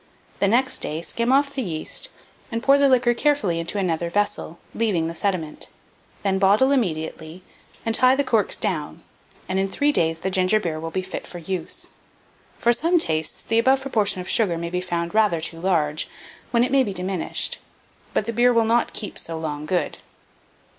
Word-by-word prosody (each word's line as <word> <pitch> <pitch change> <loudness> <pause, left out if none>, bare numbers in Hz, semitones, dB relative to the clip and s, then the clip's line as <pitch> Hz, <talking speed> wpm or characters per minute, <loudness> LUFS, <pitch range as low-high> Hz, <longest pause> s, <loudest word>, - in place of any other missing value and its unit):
The 200 - +3
next 255 +5 +3
day 155 +2 -4
skim 235 +6 -1
off 280 +1 +3
the 270 - -2
yeast, 165 -8 -3 0.4
and 230 +1 -3
pour 275 +1 +5
the 280 -1 +5
liquor 245 -2 +4
carefully 235 - +1
into 170 +5 -3
another 170 -3 -1
vessel, 205 -3 -1 0.2
leaving 205 -8 0
the 165 - -3
sediment; 170 -3 -3 0.6
then 190 -1 +1
bottle 205 +8 +4
immediately, 160 - -2 0.4
and 225 - 0
tie 255 +3 +5
the 285 - +1
corks 225 -6 +2
down, 160 -2 -3 0.4
and 190 +1 -1
in 195 0 0
3 290 +8 +2
days 165 - +1
the 190 - -2
ginger 185 +3 +3
beer 165 -6 -3
will 165 +1 -5
be 185 +3 -3
fit 185 - -6
for 175 - -8
use. 175 0 -4 0.7
For 240 - +3
some 335 +8 +3
tastes, 160 - -1
the 225 - +1
above 265 +3 +3
proportion 210 -8 +1
of 180 - -8
sugar 195 -7 +2
may 170 0 -4
be 180 0 -1
found 170 -1 -3
rather 210 -6 +3
too 165 +1 -2
large, 160 -5 +1 0.4
when 235 0 +3
it 250 - -1
may 275 -1 +5
be 210 -6 -1
diminished; 185 -1 -2 0.5
but - - 0
the 230 - -3
beer 245 +2 +4
will 230 -2 +3
not 235 +2 +1
keep 210 - -5
so 165 -1 -4
long 150 -2 -4
good. 180 0 -1
195 Hz, 190 wpm, -23 LUFS, 170-235 Hz, 0.7 s, pour